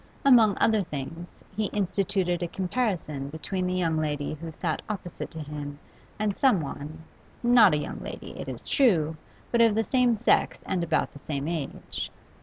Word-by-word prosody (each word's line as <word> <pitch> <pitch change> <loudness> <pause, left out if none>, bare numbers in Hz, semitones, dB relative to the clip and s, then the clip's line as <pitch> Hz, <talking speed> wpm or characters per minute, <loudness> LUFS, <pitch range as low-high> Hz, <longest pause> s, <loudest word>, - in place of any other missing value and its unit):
Among 230 -7 +6
other 220 -2 +3
things, 165 +1 -7
he 215 +1 0
instituted 195 -3 0
a 175 - 0
comparison 180 - -2
between 180 +5 -3
the 180 - -1
young 165 -3 +1
lady 150 -2 -1
who 165 +2 -7
sat - - -2
opposite 185 -5 -5
to 160 - -8
him 145 -1 -6 0.4
and 210 -2 0
someone 160 - 0 0.4
not 235 -8 +7
a - - +2
young 150 - -4
lady, - - -7
it - - -7
is - - -7
true, 165 - +3 0.4
but 235 - +4
of 225 -2 +5
the 225 - +2
same 250 -3 +3
sex 225 +3 +2
and 180 -2 0
about 160 -1 0
the 145 - -11
same 140 0 -3
age. 160 -5 -4
175 Hz, 170 wpm, -27 LUFS, 155-215 Hz, 0.4 s, not